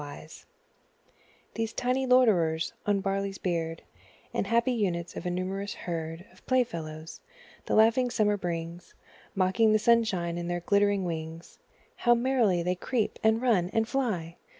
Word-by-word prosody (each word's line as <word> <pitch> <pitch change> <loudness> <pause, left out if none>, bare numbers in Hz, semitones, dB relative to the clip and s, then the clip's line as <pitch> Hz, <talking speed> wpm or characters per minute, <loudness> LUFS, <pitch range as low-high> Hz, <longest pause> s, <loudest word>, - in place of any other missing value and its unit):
Insects 145 +2 -10 1.1
These 225 0 -3
tiny 255 +2 0
loiterers 180 -11 +3
on 205 - +3
the 195 - -1
barley's 195 0 -2
beard, 165 -2 -3 0.5
And - - -1
happy 235 +3 +2
units 180 -7 -2
of - - -5
a - - 0
numerous 190 +3 -3
herd 165 0 -5
Of - - -22
playfellows, 165 -11 -2 0.5
the - - +1
laughing 230 +3 +4
Summer 215 -4 +2
brings, 170 -2 -5 0.4
Mocking 190 +4 +3
the - - +5
sunshine 210 -7 +1
in 170 - -4
their 175 0 -2
glittering 200 +1 +2
wings, 165 0 -6 0.4
How 240 -1 +4
merrily 235 -8 +2
they 180 +1 +1
creep, 220 +5 -2
and 220 +2 +3
run, 195 -8 +2
and 225 0 +1
fly! 210 -11 -2
195 Hz, 150 wpm, -28 LUFS, 170-225 Hz, 1.1 s, the